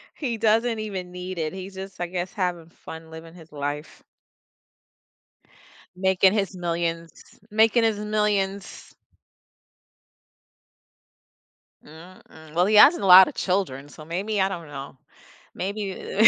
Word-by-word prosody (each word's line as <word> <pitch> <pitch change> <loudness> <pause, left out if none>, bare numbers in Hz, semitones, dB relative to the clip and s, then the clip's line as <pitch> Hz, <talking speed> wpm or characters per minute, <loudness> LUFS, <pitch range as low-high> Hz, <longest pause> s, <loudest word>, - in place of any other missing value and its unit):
He 245 -6 -3
doesn't 225 +1 +2
even 190 -4 -5
need 180 0 -7
it, 155 0 -3
he's 190 +1 -8
just 190 -1 -8
I 175 - -1
guess, 180 +1 -4
having 175 -4 -3
fun 160 -1 -12
living 165 +1 -11
his 165 -3 -15
life. 145 +1 -5 1.9
Making 190 +1 +3
his 200 -2 -1
millions. 170 -1 -3 0.4
Making 225 +2 +4
his 220 -2 +1
millions. 210 -2 -2 2.9
Mm, 165 +5 -14
mm, 160 -1 -15
well, 175 +2 +3
he 210 +2 +2
has 280 +10 +8
a 200 - -4
lotta 185 0 +9
children, 175 -8 -2
so 150 +1 -13
maybe 195 +6 -2
I 190 - +2
don't 170 -4 -7
know 140 -1 -9 0.6
maybe 200 +1 -2
185 Hz, 125 wpm, -24 LUFS, 165-205 Hz, 2.9 s, lotta